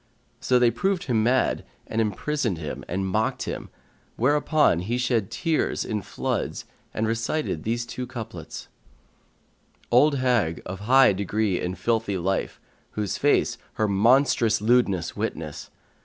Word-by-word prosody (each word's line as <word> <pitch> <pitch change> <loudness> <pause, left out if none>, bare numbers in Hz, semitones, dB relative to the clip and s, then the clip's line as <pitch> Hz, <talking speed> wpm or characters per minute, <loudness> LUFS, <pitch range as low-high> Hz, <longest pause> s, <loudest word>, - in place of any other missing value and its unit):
So 125 - +2
they 120 -1 +4
proved 185 - 0
him 120 -5 +1
mad 125 +4 +2 0.2
and 115 - -1
imprisoned 115 - -1
him 80 -2 -6
and 95 +2 -2
mocked 110 +4 -1
at - - -1
him, - - -8 0.5
where 130 +6 +2
upon 150 - +3
he 110 +7 -2
shed 120 -5 0
tears 165 -3 -1
in 105 -1 -2
floods - - -3 0.3
and 110 - -1
recited 115 - -1
these 115 +4 -2
two 125 +2 -6
couplets, 115 -2 -8 1.2
"Old 140 +5 +5
hag, 125 -11 +1
of 90 +1 -6
high 130 +2 +5
degree 100 0 -1
in 90 +1 -3
filthy 110 +1 0
life, 95 +2 -2 0.2
* - - -38
Whose 105 -2 -2
face 125 -4 +2
her 110 - 0
monstrous 115 +2 +3
lewdness 105 -6 +2
witnesses. 75 -2 -4
115 Hz, 145 wpm, -25 LUFS, 100-125 Hz, 1.2 s, Old